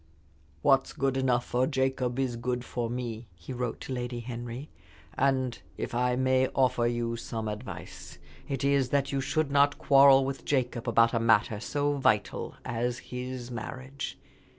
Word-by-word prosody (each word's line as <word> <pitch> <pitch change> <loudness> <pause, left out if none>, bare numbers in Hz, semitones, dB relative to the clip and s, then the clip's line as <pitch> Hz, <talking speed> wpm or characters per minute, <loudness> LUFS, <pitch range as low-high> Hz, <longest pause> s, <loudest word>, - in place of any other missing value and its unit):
"What's 135 -1 +3
good 135 -1 0
enough 125 -2 +1
for 125 +1 +1
Jacob 130 -3 0
is 130 -3 0
good 125 +1 -2
for 120 -1 -3
me," 120 -2 -4
he 85 +9 -8
wrote 125 -1 -3
to 130 - -5
Lady 120 -1 -3
Henry, 120 +3 -6 0.4
"and 130 -2 +1 0.2
if - - -4
I 125 +1 +1
may 130 0 +3
offer 125 -2 +3
you 120 -1 -1
some 115 -1 -4
advice, 105 -7 -7 0.3
it 135 -2 -2
is 140 -2 +2
that 140 0 +1
you 135 -1 0
should 150 +2 0
not 140 0 +4
quarrel 135 -1 +6
with 135 0 -4
Jacob 125 -3 -1
about 115 +1 +4
a 115 - +2
matter 110 -2 +3
so 145 +5 0
vital 105 -6 +1
as 120 +1 -1 0.2
his 125 0 -5
marriage. 130 +3 -6
125 Hz, 160 wpm, -29 LUFS, 120-135 Hz, 0.4 s, quarrel